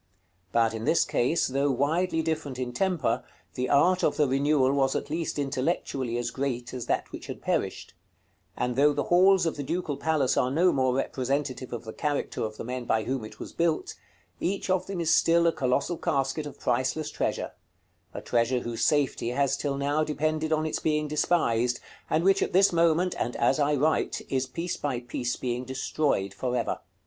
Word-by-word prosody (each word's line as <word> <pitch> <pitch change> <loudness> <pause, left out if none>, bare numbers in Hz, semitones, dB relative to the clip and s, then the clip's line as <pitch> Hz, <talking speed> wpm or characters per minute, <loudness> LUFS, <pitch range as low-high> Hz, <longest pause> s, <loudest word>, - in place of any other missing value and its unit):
But 115 -1 +2
in 110 0 -4
this 165 - +3
case, 130 +8 +1
though 140 +2 0
widely 160 +6 +1
different 155 -5 -2
in 125 -1 -3
temper, 180 0 0 0.3
the 125 0 -2
art 180 +6 +4
of - - +2
the 150 -2 +3
renewal 135 0 +2
was 135 -1 +2
at 145 - -3
least 165 -1 -2
intellectually 135 -3 -1
as 120 0 -2
great 125 -3 -3
as 125 -2 -5
that - - -1
which - - -8
had - - -6
perished: - - -2 0.6
and 125 -1 -1
though 145 +3 +4
the 145 - -1
halls 190 +1 +5
of 165 - -1
the 145 - -3
Ducal 155 -1 -2
Palace 150 -3 +1
are 125 - +2
no 170 +7 +3
more 130 -2 +1
representative 135 0 -2
of 120 - -5
the 110 - -8
character 145 -1 -2
of 110 -1 -3
the - - -5
men 125 +1 -4
by 110 -1 +1
whom 130 -1 -2
it 110 - -10
was - - -8
built, 165 -2 0 0.5
each 195 0 -1
of 185 -1 +1
them 195 -3 -4
is 165 -1 +2
still 170 0 +4
a 170 - +5
colossal 140 +4 0
casket 145 -1 -1
of 145 - -11
priceless 130 +5 0
treasure; - - -2 0.6
a - - -7
treasure 120 +1 +1
whose 115 -1 -3
safety 140 -3 +1
has 135 +2 +1
till 140 -1 -2
now 145 +2 +1
depended 155 +1 -1
on 155 0 +1
its 155 - -2
being 150 -1 0
despised, 125 -6 +1 0.3
and 160 - +2
which 195 +1 +4
at - - -1
this 195 0 +5
moment, 170 +2 +3
and 120 - -2
as 130 +4 +2
I 145 0 +2
write, 150 +3 0
is 130 -1 0
piece 165 +6 -4
by 130 -4 -2
piece 120 0 -3
being 125 0 -3
destroyed 130 -5 -1
for 125 +5 -2
ever. 115 - -1
140 Hz, 195 wpm, -27 LUFS, 125-160 Hz, 0.6 s, halls